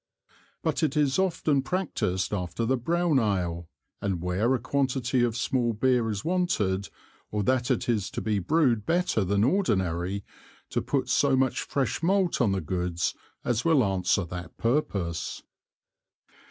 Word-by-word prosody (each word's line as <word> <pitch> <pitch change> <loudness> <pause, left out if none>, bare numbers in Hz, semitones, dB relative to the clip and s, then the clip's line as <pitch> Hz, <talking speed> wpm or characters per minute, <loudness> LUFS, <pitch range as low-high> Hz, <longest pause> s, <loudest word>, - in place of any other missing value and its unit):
But - - 0
it 150 -3 +1
is 145 +1 +2
often 160 -6 +1
practised 115 - -1
after 95 +4 -2
the 130 +3 +2
brown 165 +3 +1
Ale, 90 -6 -1 0.3
and 95 -3 -1
where 95 +9 +1
a - - -2
Quantity 130 -2 0
of 120 -1 0
small 120 -1 0
Beer 120 0 +2
is 105 -2 -4
wanted, 110 - 0 0.4
or 105 -1 -1
that 125 +2 +1
it - - 0
is 110 -5 0
to - - -4
be 105 -2 0
Brewed 125 - +2
better 175 - +1
than 100 +2 +1
ordinary, 95 - 0 0.5
to - - 0
put - - -1
so - - +3
much 130 -1 +1
fresh 140 +1 -1
Malt 185 -2 +2
on 110 -5 +3
the 95 -1 0
Goods 90 +1 -1 0.3
as 120 0 0
will 160 -6 +4
answer 95 -1 +1
that 90 -1 -8
purpose. 100 - -1
115 Hz, 155 wpm, -27 LUFS, 95-140 Hz, 0.5 s, will